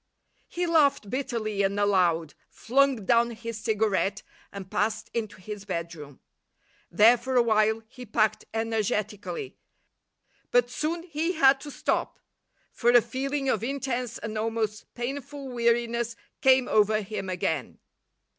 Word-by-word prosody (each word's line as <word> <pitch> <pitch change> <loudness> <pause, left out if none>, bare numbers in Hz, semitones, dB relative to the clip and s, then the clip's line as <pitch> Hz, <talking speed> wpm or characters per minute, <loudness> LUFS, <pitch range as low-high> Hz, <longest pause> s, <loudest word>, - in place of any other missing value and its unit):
He 355 +1 -2
laughed 285 - +2
bitterly 230 -6 -2
and 200 +1 0
aloud, 175 -6 +2 0.2
flung 265 -3 +1
down 235 +3 +4
his 230 -1 -6
cigarette 210 -3 0 0.3
and 190 -2 -9
passed 215 +1 -1
into 215 -4 -4
his 210 +1 -7
bedroom. 165 -7 -6 0.7
There 225 +7 +6
for 260 +2 -3
a 245 - +6
while 220 0 +2
he 250 +1 -11
packed 215 0 +1
energetically, 225 - -2 0.9
but 245 0 +3
soon 330 +6 -2
he 330 +1 -2
had 270 -4 +5
to 295 - -8
stop - - -2 0.5
for 240 - +1
a 240 0 +8
feeling 270 +4 -3
of 225 -5 +1
intense 255 -2 -2
and 215 -1 -5
almost 220 -1 -2
painful 275 +2 -5
weariness 235 -1 0 0.3
came 260 -1 +5
over 215 0 +3
him 195 -1 -5
again. 160 -7 -2
230 Hz, 130 wpm, -27 LUFS, 210-260 Hz, 0.9 s, a